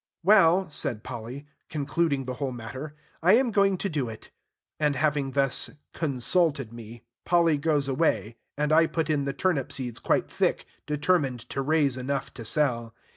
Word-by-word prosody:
"Well," 190 Hz, -1 st, +5 dB
said 115 Hz, -6 st, -2 dB
Polly, 120 Hz, +4 st, -7 dB, 0.2 s
concluding 150 Hz, -1 st, 0 dB
the 130 Hz, 0 st, -4 dB
whole 135 Hz, -2 st, -1 dB
matter, 130 Hz, +5 st, -7 dB, 0.3 s
"I 180 Hz, +4 st, +5 dB
am 245 Hz, +1 st, +4 dB
going 200 Hz, -2 st, +3 dB
to 200 Hz, -, -2 dB
do 145 Hz, -9 st, -2 dB
it." 110 Hz, -, -11 dB, 0.5 s
And, 150 Hz, -2 st, +2 dB
having 145 Hz, -1 st, +1 dB
thus 135 Hz, -1 st, +1 dB, 0.2 s
"consulted" 140 Hz, -3 st, 0 dB
me, 115 Hz, 0 st, -10 dB, 0.2 s
Polly 165 Hz, -4 st, +3 dB
goes 145 Hz, -2 st, +1 dB
away; 130 Hz, -5 st, 0 dB, 0.2 s
and 150 Hz, +1 st, 0 dB
I 165 Hz, +1 st, +5 dB
put 160 Hz, -1 st, -1 dB
in 145 Hz, -2 st, 0 dB
the 140 Hz, -, -2 dB
turnip 145 Hz, -3 st, 0 dB
seeds 125 Hz, -4 st, -3 dB
quite -, -, +1 dB
thick, -, -, 0 dB, 0.2 s
determined 150 Hz, -4 st, +1 dB
to 135 Hz, -, -1 dB
raise 140 Hz, -2 st, +2 dB
enough 135 Hz, +2 st, -3 dB
to 115 Hz, -, -8 dB
sell. 120 Hz, -3 st, 0 dB
140 Hz, 165 wpm, -27 LUFS, 130-160 Hz, 0.5 s, Well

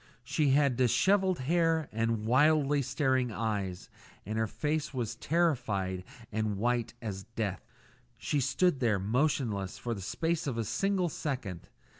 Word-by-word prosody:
She 145 Hz, +4 st, +1 dB
had 140 Hz, -2 st, +3 dB
dishevelled 185 Hz, -, +3 dB
hair 165 Hz, +1 st, +2 dB
and 115 Hz, -1 st, -1 dB
wildly 145 Hz, +3 st, +4 dB
staring 130 Hz, -2 st, +1 dB
eyes, 100 Hz, -5 st, -3 dB, 0.4 s
and 110 Hz, +3 st, -4 dB
her 110 Hz, -, +1 dB
face 150 Hz, +4 st, -2 dB
was 120 Hz, -4 st, -2 dB
terrified 120 Hz, -, 0 dB, 0.3 s
and 110 Hz, -1 st, -1 dB
white 120 Hz, +2 st, 0 dB
as 95 Hz, -3 st, -5 dB
death. 100 Hz, -5 st, -2 dB, 0.5 s
She 145 Hz, -, -1 dB
stood 140 Hz, +3 st, +2 dB
there 115 Hz, -5 st, +2 dB
motionless 110 Hz, -2 st, 0 dB
for 120 Hz, -, -3 dB
the 100 Hz, -, -6 dB
space 165 Hz, -, -1 dB
of 125 Hz, -4 st, -2 dB
a 115 Hz, -, 0 dB
single 195 Hz, -, 0 dB
second. 125 Hz, -, -4 dB
125 Hz, 140 wpm, -30 LUFS, 110-150 Hz, 0.5 s, wildly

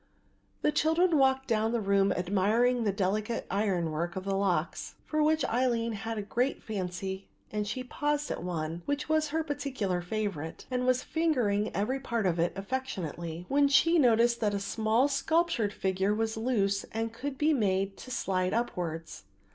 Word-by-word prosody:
The -, -, +4 dB
children 320 Hz, +1 st, +3 dB
walked 265 Hz, 0 st, +3 dB
down 225 Hz, 0 st, +1 dB
the 235 Hz, -, +1 dB
room 200 Hz, -1 st, +2 dB
admiring 215 Hz, +7 st, +2 dB
the 205 Hz, -, +3 dB
delicate 210 Hz, +4 st, -1 dB
iron 185 Hz, -5 st, 0 dB
work 170 Hz, +3 st, -2 dB
of 190 Hz, -, -4 dB
the 195 Hz, 0 st, -1 dB
locks, 185 Hz, -4 st, -1 dB
for 310 Hz, 0 st, 0 dB
which 310 Hz, +1 st, +3 dB
Aline 235 Hz, -2 st, +1 dB
had 225 Hz, +1 st, -4 dB
a 210 Hz, -, -2 dB
great 245 Hz, +6 st, -1 dB
fancy 190 Hz, -1 st, -4 dB, 0.2 s
and 210 Hz, -1 st, -2 dB
she 255 Hz, +5 st, -3 dB
had 250 Hz, -, -12 dB
paused 295 Hz, 0 st, -1 dB
at -, -, -3 dB
one, 165 Hz, -1 st, -3 dB
which 285 Hz, 0 st, -1 dB
was 310 Hz, 0 st, +2 dB
her 320 Hz, +2 st, -1 dB
particular 260 Hz, -, -2 dB
favourite, 175 Hz, -5 st, -4 dB
and 250 Hz, 0 st, 0 dB
was 255 Hz, 0 st, +2 dB
fingering 245 Hz, -11 st, +1 dB
every 235 Hz, +7 st, 0 dB
part 235 Hz, -5 st, -2 dB
of 175 Hz, -2 st, +1 dB
it 170 Hz, +1 st, +2 dB
affectionately, 180 Hz, -, -4 dB
when 285 Hz, +1 st, +4 dB
she 325 Hz, +5 st, +4 dB
noticed 235 Hz, -2 st, +4 dB
that 210 Hz, -2 st, +1 dB
a -, -, -1 dB
small 220 Hz, +5 st, +1 dB
sculptured 285 Hz, -5 st, +1 dB
figure 190 Hz, +1 st, 0 dB
was 225 Hz, 0 st, -1 dB
loose 210 Hz, -4 st, 0 dB
and 225 Hz, 0 st, -4 dB
could 270 Hz, +3 st, -5 dB
be 305 Hz, +2 st, +3 dB
made 195 Hz, -5 st, +1 dB
to -, -, -10 dB
slide 185 Hz, -6 st, 0 dB
upwards. 170 Hz, -8 st, -3 dB
220 Hz, 175 wpm, -30 LUFS, 195-260 Hz, 0.2 s, The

